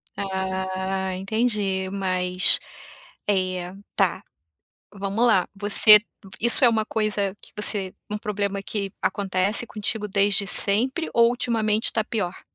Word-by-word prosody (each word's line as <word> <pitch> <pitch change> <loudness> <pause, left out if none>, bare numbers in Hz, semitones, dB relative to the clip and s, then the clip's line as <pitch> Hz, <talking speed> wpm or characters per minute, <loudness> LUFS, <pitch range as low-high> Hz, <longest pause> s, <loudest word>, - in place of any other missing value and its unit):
Ah, 190 0 -3
entendi, 200 -1 -1
mas 185 -2 +4 0.7
é 185 -2 -2 0.2
tá. - - 0 0.7
Vamos 200 +4 -1
lá. 195 -6 +2
Você 210 +1 +6 0.4
isso 235 +4 +3
é - - +7
uma 220 -2 0
coisa 210 -3 -2
que - - -14
você 205 -3 0 0.2
um 210 - -3
problema 200 -1 -3
que 200 -1 -4
acontece 195 +3 +1
contigo 210 0 -5
desde 200 0 +1
sempre 250 +12 +1
ou 235 0 +4
ultimamente 225 -3 0
tá 220 - -1
pior? 195 -5 -4
200 Hz, 120 wpm, -23 LUFS, 190-215 Hz, 0.7 s, é